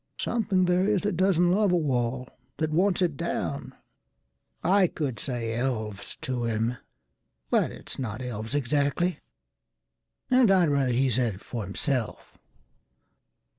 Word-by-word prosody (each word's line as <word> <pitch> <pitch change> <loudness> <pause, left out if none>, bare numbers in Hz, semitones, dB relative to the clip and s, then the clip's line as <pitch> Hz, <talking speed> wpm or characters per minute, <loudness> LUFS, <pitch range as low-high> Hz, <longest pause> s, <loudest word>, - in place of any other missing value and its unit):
Something 200 -6 +1
there 180 +1 +2
is 205 -3 +1
that 205 -3 0
doesn't 175 -1 +3
love 205 0 +3
a - - +4
wall, 130 -4 -1 0.3
That 155 -1 -1
wants 185 +3 +2
it 165 -5 0
down." - - -3 0.9
I 190 +2 +4
could 140 -8 -3
say 120 -4 -2
"Elves" 110 -5 -3
to 125 -2 -2
him, 115 +2 -1 0.7
But - - +2
it's - - -7
not 115 -3 -4
elves 115 -1 -4
exactly, 145 +6 +1 1.1
and 255 -3 +5
I'd 185 -4 +5
ratherHe 135 -2 +2
said 120 -3 +1
it 95 - -14
for 115 -3 -5
himself. 120 - -3
140 Hz, 135 wpm, -27 LUFS, 120-180 Hz, 1.1 s, and